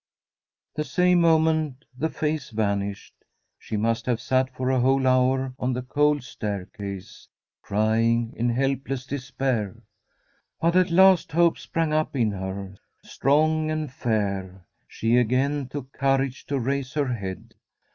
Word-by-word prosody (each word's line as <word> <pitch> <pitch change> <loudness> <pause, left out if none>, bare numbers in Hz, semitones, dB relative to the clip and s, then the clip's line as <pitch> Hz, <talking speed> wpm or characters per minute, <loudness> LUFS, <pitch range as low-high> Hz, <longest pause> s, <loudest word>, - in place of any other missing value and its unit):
The 150 - -2
same 180 +5 +3
moment 160 -4 +2
the 160 +5 -1
face 155 -3 -2
vanished. 100 -2 -2 0.5
She 110 - -4
must 115 +2 0
have 120 -2 +1
sat 130 +1 +1
for 130 0 -2
a 130 - +2
whole 135 +2 +3
hour 130 +1 +2
on 125 +1 0
the 125 0 -3
cold 145 +1 +1
stair 105 -6 -4
case, 100 -3 -8 0.3
crying 115 +2 +1
in 120 +1 0
helpless 135 +1 -1
despair. 130 -7 -3 0.8
But 170 +1 +2
at 185 0 +4
last 185 -1 +5
hope 170 0 +3
sprang 165 -2 -1
up 155 -1 0
in 115 -5 +2
her, 95 0 -6 0.3
strong 155 +3 +1
and 155 -4 -3
fair. 100 -6 -2 0.2
She 115 +2 +1
again 130 +4 +1
took 135 -1 -7
courage 135 -1 0
to 140 - -1
raise 135 +1 -2
her 140 -4 0
head. 95 -5 -6
130 Hz, 140 wpm, -25 LUFS, 115-150 Hz, 0.8 s, last